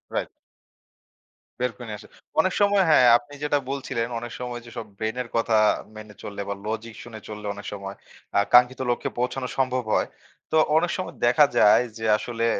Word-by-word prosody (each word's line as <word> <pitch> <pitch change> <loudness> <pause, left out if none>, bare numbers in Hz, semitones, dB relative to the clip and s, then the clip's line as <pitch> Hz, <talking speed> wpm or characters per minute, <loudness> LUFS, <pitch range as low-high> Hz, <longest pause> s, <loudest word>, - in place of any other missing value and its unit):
Right. - - -1 1.3
বের 125 0 0
করে 120 - -9
নিয়ে 105 -1 -5
আসে। - - -14 0.3
অনেক 185 +3 +3
সময় 200 -1 +4
হ্যাঁ, 140 -5 +6
আপনি 145 +3 -16
যেটা 145 0 +2
বলছিলেন 130 -4 -2
অনেক 120 0 -7
সময় 125 -1 -5
যে, - - -11
সব - - -4
brain 110 +1 -2
এর 120 - -8
কথা 115 -1 +2 0.4
মেনে 110 -1 -10
চললে 100 0 -6
বা - - 0
logic 110 +1 -4
শুনে 115 -2 -10
চললে 105 -1 -8
অনেক 100 0 -10
সময় 100 -1 -7 0.4
আ - - +4
আকাঙ্ক্ষিত 125 +3 +5
লক্ষ্যে 120 - -1
পৌঁছানো 125 +1 -1
সম্ভব 130 -1 +1
হয়। - - +2 0.5
তো - - +5 0.2
অনেক 170 +2 +1
সময় 185 - -5
দেখা 125 +5 +6
যায় 105 +3 +6
যে, 110 - -5
আসলে 115 +1 -3
120 Hz, 185 wpm, -24 LUFS, 110-130 Hz, 1.3 s, হ্যাঁ